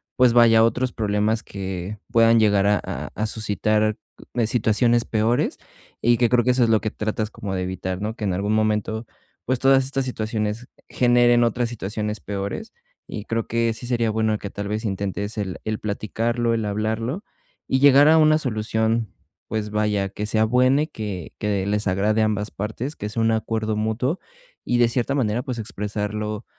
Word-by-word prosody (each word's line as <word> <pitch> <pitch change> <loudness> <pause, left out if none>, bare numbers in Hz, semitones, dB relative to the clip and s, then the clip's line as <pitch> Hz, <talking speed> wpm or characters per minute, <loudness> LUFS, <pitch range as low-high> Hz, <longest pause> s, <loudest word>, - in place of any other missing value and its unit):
pues, 125 -2 +4
vaya, 115 -2 +6
otros 125 +2 +1
problemas 105 +1 0
que 95 +1 -6
puedan 115 0 +5
llegar 105 -2 +3
a 105 -1 +3 0.3
a 110 - -2
suscitar, 110 0 0 0.4
eh, 120 -3 +1
situaciones 115 +1 +2
peores 115 +2 0 0.4
y 120 +1 +4
que 120 0 +3
creo 125 -1 +3
que 125 - +3
eso 125 0 +3
es 115 - +2
lo 110 -1 +3
que 110 - -1
tratas 110 0 -3
como 100 -3 -6
de 95 - -1
evitar, 95 0 -4
¿no?, 110 +2 -3
que 110 - -7
en 100 -3 0
algún 100 +3 -1
momento, 110 +1 0 0.4
pues, 130 0 0
todas 135 0 +4
estas 135 0 -1
situaciones 110 -1 -3 0.2
generen 120 -1 +4
otras 120 +1 0
situaciones 105 -1 -4
peores, 100 +2 -5 0.4
y 105 - -5
creo 115 0 -2
que 115 0 +1
sí 120 +2 -7
sería 115 -3 +1
bueno 110 0 +1
que, 100 - -7
tal 100 0 -5
vez, 105 +2 -3
intentes 100 +2 -3
el 95 -4 -3
el 110 0 -3
platicarlo, 115 +3 -1
el 115 -1 0
hablarlo 110 - -2 0.4
y 130 - +1
llegar 140 +1 +7
a 160 +1 +6
una 155 0 +5
solución, 110 -3 -1 0.4
pues, 105 -1 -3
vaya, 105 -2 0
que 105 +2 -5
sea 110 0 +2
buena 130 +5 +3
y 155 - -4
que 105 - -6
que 100 -2 -1
les 105 +1 -1
agrade 105 +4 +1
a - - +4
ambas 105 -1 -1
partes, 110 +8 -4
que 105 - -5
sea 115 +1 -1
un 115 - +3
acuerdo 110 0 -1
mutuo 110 - -1 0.4
y, 120 - 0
de 120 -1 +5
cierta 125 +3 -1
manera, 120 -3 0
pues, 125 -3 -5
expresarlo, 105 0 -4
110 Hz, 185 wpm, -23 LUFS, 105-120 Hz, 0.4 s, llegar